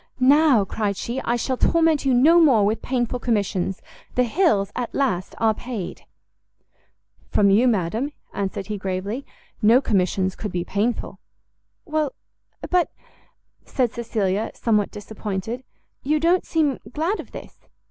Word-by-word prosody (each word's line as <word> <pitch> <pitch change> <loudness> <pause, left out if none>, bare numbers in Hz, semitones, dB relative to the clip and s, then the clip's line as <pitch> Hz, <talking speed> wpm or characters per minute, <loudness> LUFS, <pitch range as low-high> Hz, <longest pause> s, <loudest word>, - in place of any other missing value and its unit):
"Now," 270 -4 +5
cried 200 0 -2
she, 240 +5 -3
"I 235 - 0
shall 255 +2 -1
torment 325 -2 +2
you 265 - +3
no 315 +8 +6
more 245 -10 +5
with 215 +2 0
painful 250 -1 -1
commissions; 200 -5 -1 0.3
the 250 - +4
Hills, 240 - +2
at 245 -2 -4
last, 200 -10 -1
are 225 -1 +3
paid!" 225 -5 -6 1.2
"From 200 -1 +3
you, 225 +6 +4
madam," 225 - 0 0.2
answered 195 -1 -3
he 210 +1 -4
gravely, 195 +7 -4 0.3
"no 225 +4 +6
commissions 190 -5 0
could 210 - -5
be 175 -1 -2
painful." 210 +6 -2 0.7
"Well, 310 -3 -1 0.6
but," 360 -1 +3 0.7
said 245 -3 -1
Cecilia, 215 -3 -1
somewhat 210 -3 +1
disappointed, 210 +3 -5 0.4
"you 300 +3 +1
don't 345 +3 +2
seem 305 -5 +1
glad 335 +8 -1
of - - -9
this?" - - -12
230 Hz, 135 wpm, -23 LUFS, 200-275 Hz, 1.2 s, no